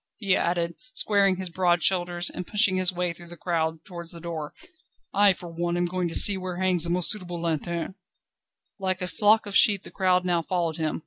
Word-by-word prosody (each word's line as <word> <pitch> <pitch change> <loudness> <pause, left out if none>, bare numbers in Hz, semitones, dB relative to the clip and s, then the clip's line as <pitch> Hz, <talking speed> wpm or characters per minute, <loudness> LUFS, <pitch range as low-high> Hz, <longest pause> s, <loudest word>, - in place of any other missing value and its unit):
_" - - -61
he 195 -4 +1
added, 170 0 -1 0.2
squaring 200 -2 +2
his 185 -1 -6
broad 175 -1 +1
shoulders, 175 -2 0
and 180 - -7
pushing 205 -2 +2
his 185 -1 +3
way 180 -1 -2
through 175 +1 -14
the 175 0 -12
crowd 160 -2 -2
towards 170 -3 -7
the 170 - -7
door, 160 -3 -6 0.6
"I 200 0 +5
for 180 -1 -7
one 170 +1 -3
am 175 - 0
going 180 0 -2
to 165 - -3
see 200 -2 +7
where 185 -1 -6
hangs 185 -2 +2
the - - -4
most 175 0 +4
suitable 180 -4 -2
lanterne." 170 +1 -3 0.9
Like 185 -1 -2
a - - -3
flock 215 +4 +2
of 200 -1 -6
sheep 200 -3 +5
the - - -12
crowd 185 -1 +1
now 175 -2 +1
followed 170 -2 -2
him. 155 -2 -2
175 Hz, 215 wpm, -25 LUFS, 170-185 Hz, 0.9 s, see